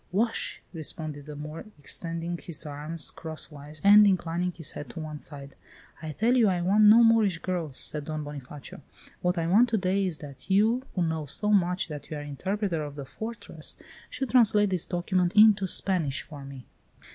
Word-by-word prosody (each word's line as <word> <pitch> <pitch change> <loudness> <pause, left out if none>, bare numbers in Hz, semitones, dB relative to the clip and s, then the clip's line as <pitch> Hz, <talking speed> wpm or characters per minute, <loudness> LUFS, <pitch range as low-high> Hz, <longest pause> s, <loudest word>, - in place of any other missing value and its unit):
"Wash!" 225 +5 -1
responded 155 -2 -5
the 150 - -7
Moor, 150 +2 -7
extending 165 +3 -4
his 170 -3 -8
arms 150 +2 -6
crosswise 155 -2 -6
and 205 +1 +8
inclining 180 -1 0
his 165 -3 -5
head 145 - -8
to 140 - -8
one 155 -1 -6
side. 140 -2 -10 0.5
"I 155 -1 -5
tell 225 - +1
you 235 -4 +5
I 185 -2 +1
want 205 +4 +4
no 225 +3 +8
Moorish 225 -6 +4
girls," 170 -6 -3
said 150 -1 -3
Don 155 0 -4
Bonifacio. 145 -1 -9 0.4
"What 180 0 0
I 165 - 0
want 215 +8 +4
to 225 - +1
day 190 0 +1
is 170 -4 -2
that 140 +3 -11
you, 220 +6 +3
who 180 - +1
know 160 -2 -2
so 210 +9 0
much 180 -2 +2
that 145 -2 -8
you 155 - -5
are - - -5
Interpreter 180 +5 -2
of 145 -1 -7
the 140 -2 -7
Fortress, 225 - -4 0.3
should 265 -3 -4
translate 215 -5 +4
this 180 -3 0
document 180 0 0
into 210 -2 +6
Spanish 170 -7 +2
for 145 -3 -10
me." 135 -2 -10
170 Hz, 185 wpm, -27 LUFS, 150-200 Hz, 0.5 s, and